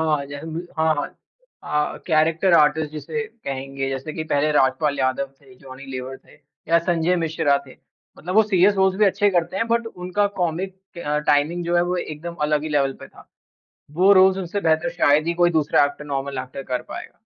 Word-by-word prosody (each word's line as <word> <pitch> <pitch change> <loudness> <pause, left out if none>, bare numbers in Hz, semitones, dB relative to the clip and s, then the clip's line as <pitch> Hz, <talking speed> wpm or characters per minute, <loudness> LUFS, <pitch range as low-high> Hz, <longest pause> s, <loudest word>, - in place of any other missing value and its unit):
हाँ। 140 - -4
जैसे 140 +2 -8
कि 175 - -9
हाँ, 160 0 +3
हाँ 145 - -2 0.9
अ, - - -9
कैरेक्टर 165 +3 +3
आर्टिस्ट 150 -1 +3
जिसे 155 +9 -4
कहेंगे, 135 - -5
जैसे 135 +3 -5
कि 160 - -4
पहले 150 0 +1
राजपाल 145 +1 +2
यादव 130 +1 0
थे, 195 - -18
जॉनी 135 -5 -12
लेवर 130 0 -6
थे - - -22 0.4
या 170 - +6
संजय 170 +1 +1
मिश्रा 160 -3 +1
थे। 130 - -13 0.4
मतलब 180 +4 -5
वो 220 - +7
सीरियस 200 -1 +3
रोल्स 190 -1 +2
भी 210 - +4
अच्छे 205 +1 +3
करते 175 0 0
हैं, 230 - 0
बट 235 0 +1
उनका 180 +1 -1
कॉमिक 180 +3 -2 0.3
अ, 150 0 0
टाइमिंग 150 +4 +1
जो 175 - 0
है, 175 - +4
वो 180 +1 -1
एकदम 170 +1 -6
अलग 150 0 +1
ही 155 - -4
लेवल 140 -2 +1
पे - - -10
था। - - -18 0.7
वो 190 +4 +5
रोल्स 190 0 +6
उनसे 190 +2 -3
बेहतर 160 0 +1
शायद 150 +2 +3
ही 170 - 0
कोई 175 - +5
दूसरा 155 -3 +3
एक्टर, 145 +1 -5
नॉर्मल 140 -1 -3
एक्टर 130 +1 -8
कर 125 -1 -3
पाएगा। - - -10
160 Hz, 200 wpm, -22 LUFS, 145-180 Hz, 0.9 s, वो